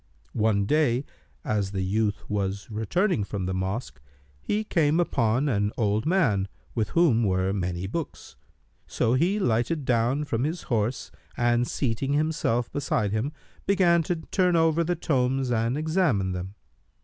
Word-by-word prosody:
One 105 -2 +2
day, 140 0 +2 0.4
as 100 -2 -1
the 95 -1 -1
youth 105 +2 -1
was 100 +1 -3
returning 115 - 0
from 100 -2 -4
the 95 - -2
mosque, 95 - -3 0.4
he 210 +1 -1
came 165 -6 +2
upon 125 -4 +1
an 105 -5 +1
old 110 +2 0
man, 125 - +2 0.3
with 110 -3 -1
whom 135 -10 +4
were 95 -1 +1
many 90 -2 -2
books; 150 - -6 0.5
so 115 - +1
he 170 +10 +2
lighted 135 - 0
down 125 +4 +1
from 120 -4 -1
his 160 +4 -2
horse 115 -1 -1 0.3
and 120 0 +2
seating 135 +2 -1
himself 150 -6 0
beside 115 -7 -1
him, 110 +7 -1 0.4
began 180 -4 +4
to 175 +2 -1
turn 180 +2 0
over 165 0 +3
the 175 +2 0
tomes 135 -5 0
and 115 +3 0
examine 155 - +1
them. 90 +2 -5
120 Hz, 150 wpm, -26 LUFS, 105-155 Hz, 0.5 s, whom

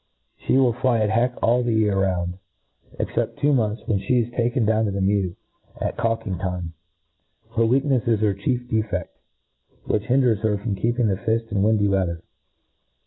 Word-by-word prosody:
She - - 0
will 130 -3 +4
fly 125 0 +1
at 105 0 +1
heck 120 +3 +1
all 120 +2 +3
the 120 -2 0
year 105 -2 +2
round, 90 -2 -1 0.6
except - - -2
two 145 +1 +2
months, 110 -4 0
when 100 -3 0
(he 120 +6 +2
is 115 +1 -5
taken 120 0 +1
down 110 +1 +2
to 100 - -1
the 100 - -3
mew, 95 -2 +1 0.4
at - - -2
cawkingrtime. 95 -6 -2 0.9
Her 115 - +2
wcaknefs 130 +1 +2
is 115 -3 +2
her 105 -2 +2
chief 125 +5 -2
defed, 110 -6 -1 0.8
which 105 -1 -1
hin4er6 125 -4 +2
}^er 105 -2 +1
from 105 +1 -3
keeping 120 +5 0
the 95 -2 0
fift 115 +1 -1
in 100 -2 0
windy 105 0 +3
weather. 90 -4 -1
110 Hz, 175 wpm, -23 LUFS, 100-120 Hz, 0.9 s, will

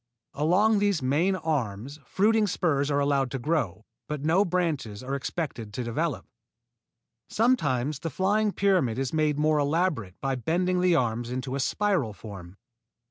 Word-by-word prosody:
Along 195 +9 +3
these 200 -8 +1
main 160 +9 +2
arms 140 - -3
fruiting 215 +2 +2
spurs 150 -6 0
are 140 -1 +1
allowed 140 -2 +1
to 135 - -3
grow, 120 - -2 0.2
but 150 -2 -4
no 165 +6 +3
branches 160 - -2
are 135 +2 -4
expected 135 -6 -4
to 125 - -2
develop. 115 -1 -2 1.0
Sometimes 150 - +1
the 165 - -4
flying 205 +7 +1
pyramid 185 - +1
is 135 +1 -2
made 155 -2 +1
more 155 0 +2
elaborate 145 - -1
by 135 -1 -1
bending 180 +8 0
the 180 -2 +4
arms 120 -4 0
into 130 +1 -4
a 140 - -2
spiral 180 - 0
form. 100 -4 -10
150 Hz, 150 wpm, -27 LUFS, 125-180 Hz, 1.0 s, the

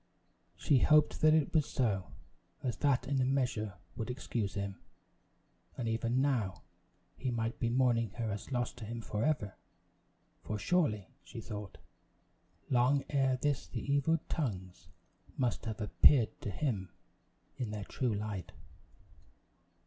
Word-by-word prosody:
She 140 - +3
hoped 150 +2 +4
that 155 0 +6
it 155 -3 +1
was 155 -3 +3
so, 100 -8 0 0.5
as 120 -5 -1
that 130 -3 +2
in 135 -1 +1
a - - +3
measure 125 -7 0 0.2
would 115 - -4
excuse 120 -5 -3
him; 100 -1 -3 1.0
and 120 - -2
even 115 +3 +1
now, 115 -10 0 0.5
he 130 - -3
might 115 -1 -2
be 120 - +1
mourning 120 -2 +2
her 115 -2 -2
as 100 +6 -6
lost 125 0 -1
to 115 - -7
him 115 +2 -5
forever! 110 -2 -1 0.9
For 105 - -3
surely, 105 - +1
she - - -9
thought, 105 -2 -7 0.9
long 130 +2 +3
ere 135 -2 +2
this 145 0 0
the 140 - -2
evil 150 +4 +3
tongues 95 - -4 0.5
must 125 -2 0
have 110 -1 -4
appeared 115 +3 +4
to - - -3
him 100 -3 -2 0.7
in 120 -4 -2
their 105 -1 -4
true 120 -1 -1
light. 100 -3 -4
120 Hz, 140 wpm, -33 LUFS, 105-135 Hz, 1.0 s, that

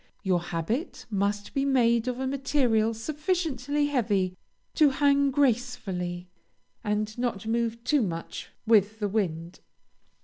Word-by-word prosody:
Your 185 -3 +2
habit 175 - -3
must 205 0 -1
be 275 - +1
made 240 -4 +3
of 250 0 -2
a 265 - -1
material 260 -5 +1
sufficiently 295 - -1
heavy 205 -10 0 0.4
to 305 -3 +5
hang 280 0 +3
gracefully, 220 -10 -1 0.6
and 210 0 -1
not 235 -5 -2
move 230 0 -1
too 290 +2 +2
much 170 -6 -4 0.2
with 215 -1 +4
the 210 -2 -1
wind. 175 -5 -2
230 Hz, 125 wpm, -27 LUFS, 200-270 Hz, 0.6 s, to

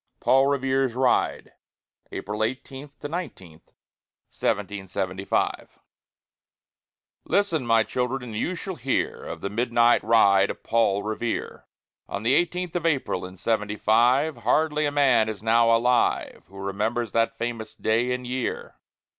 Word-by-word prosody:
PAUL 135 +1 +4
REVERE'S 135 -2 0
RIDE 130 -1 +1 0.6
[April 105 +2 -3
18 130 +4 -5
19, 145 - -5 0.8
1775] 95 -1 -2 1.5
Listen, 170 -11 0
my 115 -1 +4
children, 125 +3 -2
and 115 -3 -7
you 180 +11 -2
shall 190 +2 -5
hear 130 +2 -1
Of - - -7
the 100 - -4
midnight 120 +1 +3
ride 100 -3 +4
of - - -7
Paul 110 -3 +1
Revere, 110 +2 -4 0.4
On 100 - -4
the 120 +4 +3
eighteenth 175 +2 0
of 170 -1 0
April, 130 - -1
in 95 +1 -14
Seventy 105 +1 -1
five; 125 +9 +3
Hardly 150 -1 +1
a - - -1
man 130 -6 +3
is 105 -1 -7
now 115 +1 +4
alive 120 +2 +1
Who 95 +2 -15
remembers 105 +4 -2
that 115 0 0
famous 115 -1 -5
day 115 +3 0
and 125 0 -3
year. 125 0 -4
120 Hz, 130 wpm, -25 LUFS, 110-135 Hz, 1.5 s, PAUL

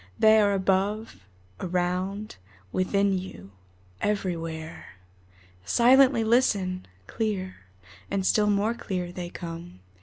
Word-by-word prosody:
They 220 0 +6
are 205 -1 +3
above, 195 - 0 0.4
around, 185 +3 -2 0.3
within 200 +1 +1
you, 100 - -10 0.5
everywhere. 165 -5 -3 0.7
Silently 250 - +5
listen! 200 -6 +1 0.2
Clear, 190 - -3 0.5
and 195 -1 -1
still 210 +1 +3
more 205 +3 +2
clear, 180 -6 -4
they 175 -1 -6
come. 170 - -8
190 Hz, 95 wpm, -26 LUFS, 180-210 Hz, 0.7 s, They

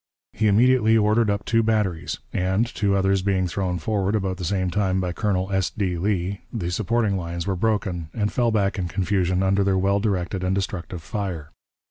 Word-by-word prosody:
He 110 - +1
immediately 115 +1 +4
ordered 110 +1 +3
up 100 0 -1
two 115 0 +3
batteries, 105 -7 0 0.2
and, 95 +5 +1
two 105 -5 0
others 95 0 +2
being 95 -1 +1
thrown 90 0 -2
forward 100 +2 -1
about 95 -3 -1
the 90 - -6
same 95 +1 0
time 95 -2 +1
by 90 -1 -1
Colonel 95 -1 -1
S. 95 -1 +1
D. 95 -5 -2
Lee, 95 0 -1
the 90 -7 -3
supporting 110 +1 0
lines 85 -1 -4
were 95 - -1
broken, 95 -5 -1
and 105 +1 -2
fell 120 -1 +2
back 100 -3 0
in 90 - -1
confusion 95 0 0
under 95 +1 +2
their 95 -1 +2
well 100 +2 +2
directed 95 -2 -1
and 95 +1 +1
destructive 90 -3 -4
fire. 85 -4 -4
95 Hz, 190 wpm, -23 LUFS, 90-105 Hz, 0.2 s, immediately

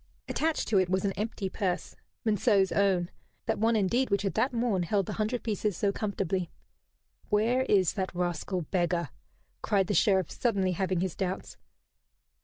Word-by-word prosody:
Attached 320 0 0
to 205 -4 +4
it 185 -1 +1
was 190 +1 +1
an 195 - +1
empty 210 0 -3
purse, 185 -2 -2 0.3
Monceux's 205 -2 +3
own 190 -3 +2 0.3
that - - -1
one 225 +2 +3
indeed 225 +6 +2
which 200 0 +1
had 195 - -1
that 235 +5 +1
morn 230 -6 0
held 195 +3 +1
the - - -4
hundred 220 +3 -1
pieces 210 -4 -1
so 200 - +1
comfortably! 195 -4 -2 0.8
"Where 230 +5 +2
is 190 -4 +3
that 185 -3 -3
rascal 175 +1 -2
beggar?" 175 -1 0 0.5
cried 200 -3 +2
the 205 - -1
Sheriff, 190 -3 +3
suddenly 200 -6 +1
having 185 0 0
his 185 -3 -2
doubts. 190 -1 -3
195 Hz, 165 wpm, -29 LUFS, 185-215 Hz, 0.8 s, to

